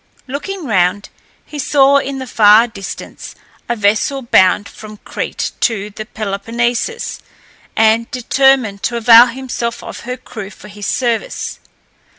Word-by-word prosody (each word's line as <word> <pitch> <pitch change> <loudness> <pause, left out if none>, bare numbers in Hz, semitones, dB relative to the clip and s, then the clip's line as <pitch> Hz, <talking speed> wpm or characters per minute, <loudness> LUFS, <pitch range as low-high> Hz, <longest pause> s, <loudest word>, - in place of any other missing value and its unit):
Looking 320 +7 -5
round, 200 -3 +1 0.4
he 300 - -8
saw 280 0 +4
in 275 0 -4
the 260 - -5
far 220 -1 +5
distance 210 -5 -9 0.3
a 240 - +1
vessel 215 +6 0
bound 200 -3 +3
from 215 -1 -11
Crete - - -4
to 210 -3 -1
the 215 +1 -8
Peloponnesus, 230 - -3 0.6
and 225 +1 +3
determined 255 -5 +2
to 240 - -2
avail 235 +1 +8
himself 240 -1 -5
of - - -8
her 250 +1 -6
crew 210 -5 -9
for 210 - -14
his 205 0 -7
service. 235 -3 -2
230 Hz, 135 wpm, -16 LUFS, 210-260 Hz, 0.6 s, avail